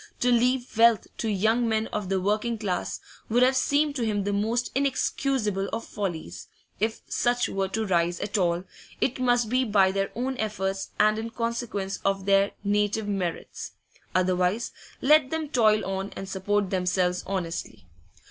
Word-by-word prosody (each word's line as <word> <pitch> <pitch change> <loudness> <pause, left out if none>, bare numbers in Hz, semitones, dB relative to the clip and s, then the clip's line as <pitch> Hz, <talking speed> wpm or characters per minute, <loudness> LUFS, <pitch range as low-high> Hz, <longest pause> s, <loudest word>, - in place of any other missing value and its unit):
To 245 - +3
leave 245 +1 +2
wealth 230 -3 +6
to 225 - -1
young 220 +4 +2
men 220 0 +1
of 210 -3 -2
the 195 -1 +1
working 215 +4 0
class 200 -4 -2 0.3
would 240 +3 +4
have 260 +1 +4
seemed 285 +2 +2
to 245 - -1
him 210 -3 0
the 205 +1 -1
most 225 +4 0
inexcusable 255 -6 0
of 225 +1 -3
follies; 160 - -5 0.3
if 220 +1 -1
such 245 0 +1
were 195 0 -1
to 220 +3 -2
rise 175 -2 +1
at 205 +1 -4
all, 175 -3 +1 0.4
it 260 0 0
must 245 -2 +2
be 255 +3 +2
by 200 -5 +3
their 195 0 -1
own 255 +3 -2
efforts 195 -3 -2
and 215 +1 +4
in 225 +1 -4
consequence 230 -4 -3
of 195 -1 0
their 195 0 +4
native 205 +1 +1
merits; 185 -5 -4 0.4
otherwise, 185 +4 +1 0.3
let 295 0 +5
them 320 -1 -3
toil 220 -6 +3
on 195 +1 -3
and 195 - -6
support 195 +1 -1
themselves 180 -1 +1
honestly. 170 - -4
210 Hz, 165 wpm, -26 LUFS, 190-235 Hz, 0.4 s, wealth